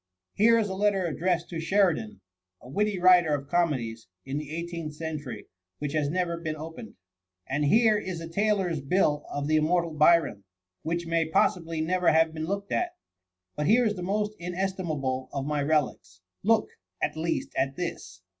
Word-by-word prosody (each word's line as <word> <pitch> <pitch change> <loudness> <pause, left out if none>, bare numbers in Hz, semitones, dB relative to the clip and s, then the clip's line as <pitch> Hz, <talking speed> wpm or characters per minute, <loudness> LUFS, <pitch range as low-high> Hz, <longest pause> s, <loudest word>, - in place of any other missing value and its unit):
Here 230 +3 +5
is 220 -2 +1
a 190 - -4
letter 195 -1 +1
addressed 175 +1 0
to 165 - -4
Sheridan, 165 - +1 0.4
a - - -15
witty 205 +8 0
writer 175 -4 +5
of 140 -1 -6
comedies, 130 - -1 0.2
in 135 +2 -3
the 150 -2 -8
eighteenth 165 -1 -5
century, 155 -5 -5 0.3
which 145 -1 -4
has 150 -2 +1
never 170 0 -1
been 160 -2 -4
opened, 160 +9 -9 0.3
— 90 +4 -20
^and 145 +1 +1
here. 220 +4 +4
is 185 -5 -5
a 165 - -6
tailor's 190 -3 0
bill 150 0 +1
of 145 0 -3
the 155 0 +3
immortal 170 +2 +1
Byron, 155 -9 +3 0.4
which 170 +2 -2
may 165 -1 0
possi 180 +2 +2
bly 165 -1 -4
never 180 +2 +2
have 160 0 +3
been 160 0 -4
looked 200 +1 -3
at. 355 0 -1 0.6
But 150 - -1
here 240 +5 +5
is 215 - +2
the 185 - -7
most 210 +3 -1
inestimable 170 -8 -2
of 140 -1 -3
my 150 0 -1
relics. 125 -12 -1 0.2
Look, 220 +2 +2 0.3
at - - -1
least, 165 +1 -2
at 135 +1 0
this. 165 - -6
165 Hz, 180 wpm, -27 LUFS, 150-185 Hz, 0.6 s, Here